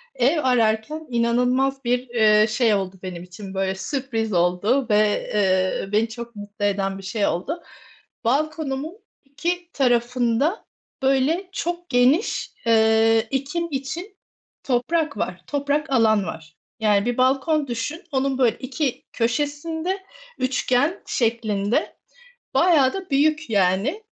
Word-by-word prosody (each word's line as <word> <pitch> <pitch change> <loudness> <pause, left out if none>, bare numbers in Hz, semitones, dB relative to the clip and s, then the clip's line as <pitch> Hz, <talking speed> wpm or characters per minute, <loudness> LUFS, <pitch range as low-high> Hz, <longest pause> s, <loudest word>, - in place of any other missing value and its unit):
ev 280 +6 +2
ararken 250 +5 +1
inanılmaz 250 +3 +1
bir, 245 +1 +2
eee, 215 -2 +4
şey 225 0 +2
oldu 195 -1 -1
benim 180 -2 -6
için, 190 +2 -10
böyle, 190 0 -1
sürpriz 225 -1 -3
oldu 180 +9 +2
ve, 210 0 +2
eee, 190 -1 +1
beni 220 +2 +2
çok 235 0 -8
mutlu 205 0 -5
eden 195 -1 0
bir 195 - -10
şey 200 +2 -1
oldu. 315 - -3 0.6
Balkonumun 300 - -1 0.3
2 340 +5 -3
tarafında, 245 - +1 0.4
böyle, 275 +8 +2
çok 350 -1 -4
geniş, 260 - +2
eee, 225 0 +4
ekim 290 +6 -2
için 325 +9 -5 0.5
toprak 280 +2 0
var, 185 - -3
toprak 290 +2 -1
alan 220 -5 +4
var, 160 -1 -8 0.2
yani, 210 -2 +2
bir 245 0 -1
balkon 275 +4 +2
düşün, 250 +8 -4
onun, 270 -1 0
böyle, 250 -4 +2
2 260 +1 -3
köşesinde 295 +9 -1 0.4
üçgen 255 +5 0
şeklinde 220 -3 0 0.6
bayağı 310 -7 +4
da 380 -2 -6
büyük, 305 +1 +2
yani, 200 - +1
245 Hz, 120 wpm, -23 LUFS, 215-290 Hz, 0.6 s, eee